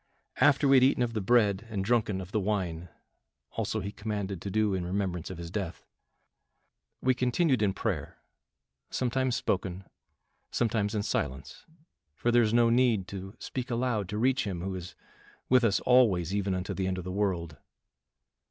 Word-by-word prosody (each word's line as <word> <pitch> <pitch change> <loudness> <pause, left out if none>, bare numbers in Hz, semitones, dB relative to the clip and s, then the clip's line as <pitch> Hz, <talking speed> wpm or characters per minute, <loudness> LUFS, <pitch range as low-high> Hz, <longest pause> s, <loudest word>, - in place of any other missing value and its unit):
After 140 0 +4
we 135 0 +7
had 130 - +5
eaten 130 -1 +4
of 115 -1 -2
the 110 - -1
bread 105 0 +2
and 100 -3 -2
drunken 110 -4 +1
of 90 +1 -9
the 110 - +1
wine 90 -5 -2 0.6
also 110 - -2
he 100 +1 -4
commanded 100 -3 -4
to 100 - -4
do 105 0 +1
in 95 -2 -1
remembrance 90 -2 -2
of 95 - -7
his 85 -1 -7
death 95 -3 -4 1.2
we 130 - +4
continued 125 +1 +1
in 105 -2 +3
prayer, - - -3 0.7
sometimes 130 0 0
spoken, 95 -2 -2 0.7
sometimes 110 -2 0
in 105 - 0
silence 65 -8 -3 0.5
for 120 - 0
there 120 0 +5
is 110 -2 +2
no 115 0 +4
need 115 -6 +3
to 95 +1 -7
speak 130 -1 -5
aloud 115 -5 -1
to 105 - -3
reach 130 +4 +2
him 90 -4 -3
who 95 +1 -3
is 90 -1 -7 0.5
'with 125 -1 +5
us 110 -3 +3
alway 120 -8 +4
even 100 +2 -1
unto 90 0 -3
the 95 -1 -2
end 95 0 -1
of 90 - -5
the 90 - -5
world. 90 -6 -1
105 Hz, 175 wpm, -29 LUFS, 95-120 Hz, 1.2 s, we